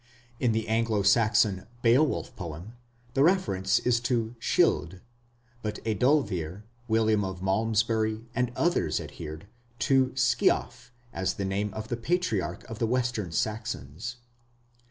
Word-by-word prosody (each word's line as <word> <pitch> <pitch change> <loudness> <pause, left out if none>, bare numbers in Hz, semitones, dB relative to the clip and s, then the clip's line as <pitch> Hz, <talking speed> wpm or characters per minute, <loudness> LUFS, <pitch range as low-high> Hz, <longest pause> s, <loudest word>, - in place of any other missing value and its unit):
In 125 - +2
the 110 0 -1
Anglo 110 -2 +1
Saxon 105 -2 +3 0.2
Beowulf 130 +6 +2
poem, 85 +4 -7 0.4
the 135 - +2
reference 150 - +3
is 120 -1 +2
to 120 -1 -1
"Scyld", 90 -5 +1 0.6
but 105 -1 -3
Ethelweard, 105 - +1 0.2
William 110 -2 +2
of 95 -1 -5
Malmesbury, 110 +2 +1
and 125 0 0
others 175 +1 +1
adhered 80 +3 -8 0.3
to 130 0 +3
"Sceaf" 130 -2 +1 0.2
as 95 0 -1
the 100 - -3
name 100 +2 -1
of 110 +1 -6
the 120 - -1
Patriarch 115 - -1
of 115 0 -7
the 115 - +1
Western 120 -6 -1
Saxons. 105 - -3
110 Hz, 125 wpm, -28 LUFS, 95-120 Hz, 0.6 s, Saxon